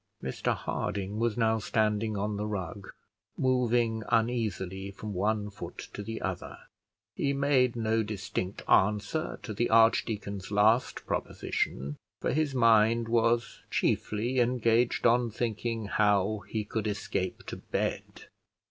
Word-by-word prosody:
Mr 65 - -1
Harding 100 +1 -3
was 115 -1 0
now 110 -1 +2
standing 110 -1 0
on 105 +1 -1
the 105 +1 -2
rug, 100 -1 -5 0.5
moving 120 -3 +2
uneasily 105 -5 0
from 105 +1 -7
one 105 +2 0
foot 100 - -8 0.2
to - - -5
the 115 +2 -5
other. 95 -2 -4 0.6
He 140 - 0
made 135 -3 +2
no 115 -1 +1
distinct 100 -2 -4
answer 105 - +2
to 110 - -5
the 120 +4 0
archdeacon's 105 -3 +2
last 110 +4 +2
proposition, 70 +4 -2 0.2
for - - -1
his 150 -2 0
mind 115 -1 +4
was 115 0 +1
chiefly 120 +5 0
engaged 120 -1 +2
on 120 0 +4
thinking 115 0 -2
how 105 0 +1
he 110 -1 -1
could 110 0 -2
escape 100 -3 -3
to - - -6
bed. - - -3
110 Hz, 130 wpm, -29 LUFS, 105-115 Hz, 0.6 s, mind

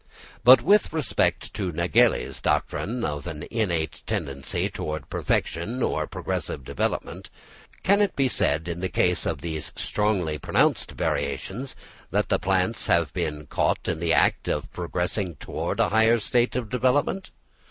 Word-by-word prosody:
But 125 +2 +8
with 205 +5 +4
respect 155 -3 0
to 95 -3 -2
Nägeli's 85 0 +2
doctrine 115 +4 -1
of 75 +1 -4
an 75 -3 -6
innate 85 -9 -1
tendency 70 -1 -2
towards 75 -2 -4
perfection 110 +10 -1
or - - 0
progressive 70 - -4
development, - - -3 0.5
can 200 +2 +4
it 205 - +1
be 135 -1 +2
said 80 -9 +1
in 85 0 -3
the 95 +1 -2
case 90 0 +1
of - - -2
these 80 -2 -4
strongly 95 -8 0
pronounced - - +1
variations, 130 +8 -3 0.3
that - - 0
the - - +2
plants 95 +3 0
have 85 -3 +2
been 75 -4 -3
caught - - 0
in 85 - -1
the 85 0 0
act - - +3
of - - -2
progressing 90 +1 -2
towards - - -4
a - - +3
higher 110 +2 +4
state 120 +2 +1
of 125 -3 -2
development? 130 +9 +1
90 Hz, 150 wpm, -25 LUFS, 80-120 Hz, 0.5 s, But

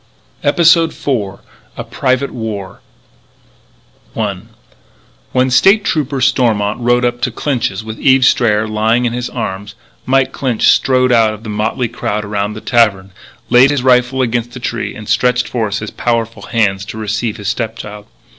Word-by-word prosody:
EPISODE 165 +2 +3
FOUR 105 -9 -3 0.4
A - - -4
PRIVATE 130 +2 -1
WAR 105 -5 -6 1.4
I - - -1 0.9
When 130 0 +1
State 195 - +4
Trooper 140 -3 -1
Stormont 115 -5 +1
rode 120 0 +2
up 120 0 -2
to 125 - +1
Clinch's 115 -5 -2
with 110 0 -8
Eve 130 -1 +4
Strayer 110 -4 +2
lying 110 +3 +1
in 120 - -1
his 125 0 -3
arms, 100 +1 -5 0.3
Mike 135 0 +2
Clinch 125 -5 +1
strode 130 -1 +3
out 110 -3 +3
of 105 - -15
the 110 - -6
motley 110 +4 -1
crowd 105 -2 -3
around 100 0 -2
the 110 - -8
tavern, 105 -6 +1 0.4
laid 125 +2 +6
his 145 -3 -1
rifle 130 0 +3
against 120 0 -2
a - - -6
tree, 120 - -4
and 105 -1 -10
stretched 125 0 +1
forth 110 -4 -2
his 110 -1 -6
powerful 115 -1 -2
hands 100 -5 0
to 110 - -8
receive 110 +1 -2
his 105 -2 -4
stepchild. 105 -2 -5
120 Hz, 155 wpm, -15 LUFS, 105-125 Hz, 1.4 s, laid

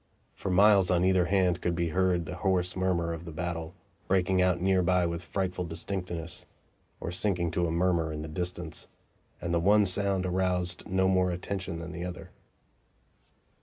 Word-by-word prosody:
For - - -5
miles 95 0 +5
on 90 0 +3
either 95 -1 +3
hand 90 -2 +1
could 85 -1 0
be 85 -1 0
heard 90 -1 +1
the 90 - -6
hoarse 90 -2 0
murmur 90 -3 0
of 80 0 -7
the 85 - -8
battle, 85 +1 -4 0.3
breaking 95 0 +2
out 90 -1 +2
near 95 +1 +2
by 90 0 +2
with 85 0 -3
frightful 90 +1 -3
distinctness, 85 0 -5 0.5
or 85 - -4
sinking 90 -2 0
to 85 0 0
a - - -2
murmur 85 -2 +1
in 75 0 -5
the - - -5
distance; 90 +1 -5 0.5
and 85 0 -3
the 85 - +3
one 105 +4 +4
sound 95 0 +1
aroused 90 -1 0
no 95 0 +2
more 95 -1 +3
attention 90 0 -4
than 85 +1 -7
the 85 - -6
other. 90 +1 -7
90 Hz, 175 wpm, -29 LUFS, 85-95 Hz, 0.5 s, miles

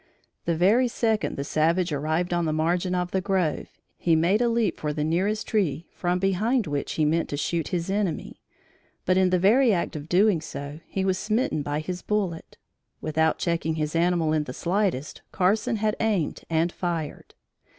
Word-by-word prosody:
The 170 - +1
very 215 +9 +4
second 225 -3 0
the 140 - -2
savage 165 +4 +1
arrived 155 +5 -1
on 175 -1 +1
the 155 - 0
margin 175 +4 0
of 180 0 -1
the 190 - 0
grove, 185 -5 0 0.3
he 165 -2 +3
made 175 +7 +3
a 240 - +3
leap 230 -5 0
for 150 -1 -2
the 150 - -2
nearest 190 +7 0
tree 175 -7 0
from 180 0 -1
behind 200 +6 +1
which 145 -2 -3
he 155 - +1
meant 165 +2 +1
to 145 - -3
shoot 165 +2 -1
his 175 -2 -2
enemy; 195 -6 -2 0.6
but 185 - +3
in 185 0 +4
the 180 - +3
very 225 +7 +4
act 175 -3 -1
of 150 +1 -7
doing 190 -2 +3
so, 145 -1 -7
he 190 -1 -2
was 190 -1 +1
smitten 215 - 0
by 145 +1 -2
his 180 +3 -5
bullet. 195 -6 -2 0.4
Without 160 +1 +1
checking 165 -2 -1
his 155 0 -2
animal 170 -2 +2
in 155 -1 +1
the 125 - -6
slightest, 175 -5 -1
Carson 200 +5 +1
had 215 0 0
aimed 210 -8 -1
and 165 +1 +1
fired. 170 -5 -4
175 Hz, 185 wpm, -25 LUFS, 155-195 Hz, 0.6 s, very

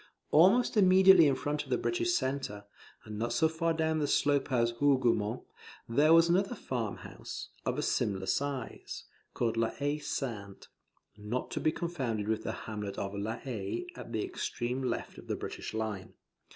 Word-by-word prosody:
Almost 195 +10 +5
immediately 190 -3 +7
in 140 - +3
front 145 +2 -2
of 140 - -16
the 125 - +2
British 350 0 0
centre, 130 - -2 0.4
and 105 -1 -6
not 120 +1 -1
so 160 +7 +4
far 165 +1 0
down 160 -1 0
the 145 - 0
slope 145 -2 +2
as 120 -2 +2
Hougoumont, 125 -5 +2 0.4
there 145 +7 +4
was 165 0 +7
another 195 +7 +2
farm 120 - -3
house, - - -8 0.2
of - - 0
a - - -1
smaller 95 -2 0
size, 135 0 -3 0.3
called 115 -1 0
La 115 0 +2
Haye 145 +1 -2
Sainte, 110 -9 -5 0.5
[Not 105 +5 -4
to - - -2
be 155 - +2
confounded 130 - -3
with 110 0 0
the - - -3
hamlet 105 -2 -5
of 100 0 -3
La 105 +3 -3
Haye 120 - -4
at - - -9
the - - -1
extreme 130 - -3
left 130 - -3
of - - -13
the - - -1
British - - -6
line. 110 -3 -4
130 Hz, 175 wpm, -31 LUFS, 110-160 Hz, 0.5 s, immediately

